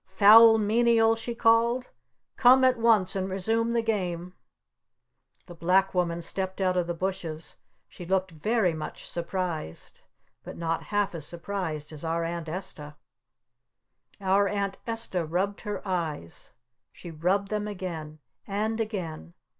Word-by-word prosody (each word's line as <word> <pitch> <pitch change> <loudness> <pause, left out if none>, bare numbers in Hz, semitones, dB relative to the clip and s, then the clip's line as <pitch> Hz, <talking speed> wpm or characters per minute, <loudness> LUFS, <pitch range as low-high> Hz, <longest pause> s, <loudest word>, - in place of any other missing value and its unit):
"Foul 225 +2 +8
Menial!" 225 +1 +3
she 235 +1 -5
called. 235 +2 +3 0.5
"Come 260 +1 +6
at 255 -2 +4
once 220 -6 +3
and 190 0 -2
resume 225 +5 0
the 235 -1 +1
Game!" 180 -5 -2 1.1
The 175 - -11
Black 185 +3 +2
Woman 170 -2 -1
stepped 190 +2 -4
out 185 -1 +1
of 180 -2 0
the 175 - -3
bushes. 165 -3 -5 0.3
She - - -11
looked 190 0 0
very 185 +3 0
much 155 -1 -7
surprised. 170 - -5 0.4
But - - -9
not 165 -1 -2
half 205 -2 0
as 160 -3 -6
surprised 170 -4 -5
as 150 - -9
our 165 +1 -1
Aunt 165 -1 -4
Esta. 155 -4 -6 1.2
Our 195 +1 +2
Aunt 200 -1 -2
Esta 225 -6 -2
rubbed 185 +6 -2
her 210 -1 -5
eyes! 160 - -4 0.4
She 170 - -10
rubbed 185 +6 0
them 210 -1 -2
again! 170 -6 -6 0.3
And 215 +3 -2
again! 165 - -5
190 Hz, 140 wpm, -27 LUFS, 170-215 Hz, 1.2 s, Foul